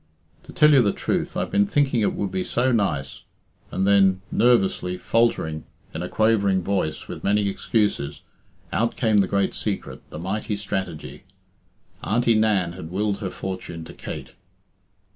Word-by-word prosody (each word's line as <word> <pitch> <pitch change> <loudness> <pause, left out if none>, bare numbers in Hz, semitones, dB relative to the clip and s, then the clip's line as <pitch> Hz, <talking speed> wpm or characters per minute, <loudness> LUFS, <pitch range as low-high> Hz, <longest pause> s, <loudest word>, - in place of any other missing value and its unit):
"To - - -11
tell 150 -2 +5
you 135 - +7
the 100 -4 +2
truth, - - -2
I've - - -2
been 100 0 +3
thinking 135 -2 +2
it 105 - +1
would 100 -2 -2
be 95 0 -1
so 130 +2 +1
nice 85 - -1 0.3
" - - -36
And 95 - 0
then, 95 -2 +4
nervously, 95 -6 +2
faltering, 90 -11 0 0.3
in - - -4
a 90 - -4
quavering 100 -4 +2
voice, 95 -5 -2
with - - -8
many 105 0 +2
excuses, 95 -8 -1 0.5
out 115 +1 +1
came 110 -4 +2
the 95 - +3
great 100 +1 0
secret, - - -4
the - - -8
mighty 100 +5 -3
strategy. 95 -5 -5 0.8
Auntie 120 +1 +2
Nan 105 -6 +2
had 85 -3 -8
willed 100 +2 -1
her 100 -4 -3
fortune 90 -3 -6
to - - -10
Kate. - - -8
100 Hz, 160 wpm, -23 LUFS, 95-110 Hz, 0.8 s, you